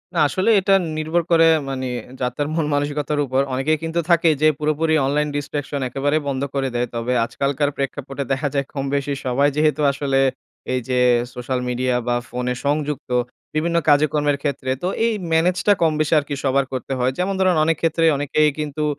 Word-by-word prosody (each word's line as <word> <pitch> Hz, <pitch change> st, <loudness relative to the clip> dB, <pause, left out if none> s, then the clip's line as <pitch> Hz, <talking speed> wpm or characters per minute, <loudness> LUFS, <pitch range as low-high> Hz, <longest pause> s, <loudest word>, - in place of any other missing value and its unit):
না, -, -, +2 dB
আসলে 185 Hz, +9 st, 0 dB
এটা 195 Hz, +1 st, +2 dB, 0.2 s
নির্ভর 160 Hz, +2 st, 0 dB
করে 165 Hz, -1 st, +6 dB, 0.2 s
মানে 130 Hz, -1 st, -3 dB, 0.3 s
যার-তার 125 Hz, +3 st, -2 dB
মন-মানসিকতার 145 Hz, -1 st, -1 dB
উপর। 130 Hz, 0 st, +1 dB
অনেকেই 140 Hz, +5 st, +1 dB
কিন্তু 165 Hz, +1 st, -1 dB
থাকে 170 Hz, -1 st, +4 dB
যে 155 Hz, -, +5 dB
পুরোপুরি 155 Hz, +1 st, 0 dB
online 150 Hz, +2 st, 0 dB
distraction 145 Hz, 0 st, -3 dB
একেবারেই 145 Hz, +4 st, 0 dB
বন্ধ 135 Hz, -1 st, -2 dB
করে 135 Hz, -1 st, 0 dB
দেয়। 120 Hz, 0 st, 0 dB
তবে 115 Hz, +2 st, -1 dB
আজকালকার 140 Hz, +4 st, -1 dB
প্রেক্ষাপটে 140 Hz, 0 st, -4 dB
দেখা 135 Hz, +2 st, 0 dB
যায় 140 Hz, -1 st, 0 dB
কম 135 Hz, -1 st, -3 dB
বেশি 140 Hz, 0 st, -1 dB
সবাই 130 Hz, +3 st, +2 dB
যেহেতু 150 Hz, 0 st, +2 dB
আসলে 140 Hz, -1 st, 0 dB, 0.5 s
এই 130 Hz, -, +1 dB
যে, 125 Hz, -1 st, +1 dB, 0.3 s
সোশ্যাল 125 Hz, +1 st, -3 dB
মিডিয়া 125 Hz, 0 st, 0 dB
বা 120 Hz, -, +2 dB
ফোনে 125 Hz, +1 st, -2 dB
সংযুক্ত 145 Hz, -2 st, -1 dB, 0.5 s
বিভিন্ন 170 Hz, +2 st, +1 dB
কাজে-কর্মের 145 Hz, 0 st, +3 dB
ক্ষেত্রে 140 Hz, -3 st, -2 dB
তো -, -, +1 dB, 0.2 s
এই 230 Hz, -, +1 dB, 0.2 s
ম্যানেজটা 180 Hz, +5 st, +3 dB
কম 165 Hz, -1 st, +4 dB
বেশি 155 Hz, +1 st, +1 dB
আরকি 145 Hz, -1 st, -5 dB
সবার 135 Hz, 0 st, +2 dB
করতে 130 Hz, +1 st, -3 dB
হয়। 125 Hz, +1 st, +2 dB
যেমন 190 Hz, +2 st, 0 dB
ধরুন 185 Hz, -2 st, +3 dB
অনেক 165 Hz, -1 st, +1 dB
ক্ষেত্রেই 165 Hz, 0 st, +3 dB
অনেকেই 150 Hz, +2 st, +2 dB
কিন্তু 150 Hz, 0 st, -3 dB
145 Hz, 175 wpm, -21 LUFS, 135-155 Hz, 0.5 s, করে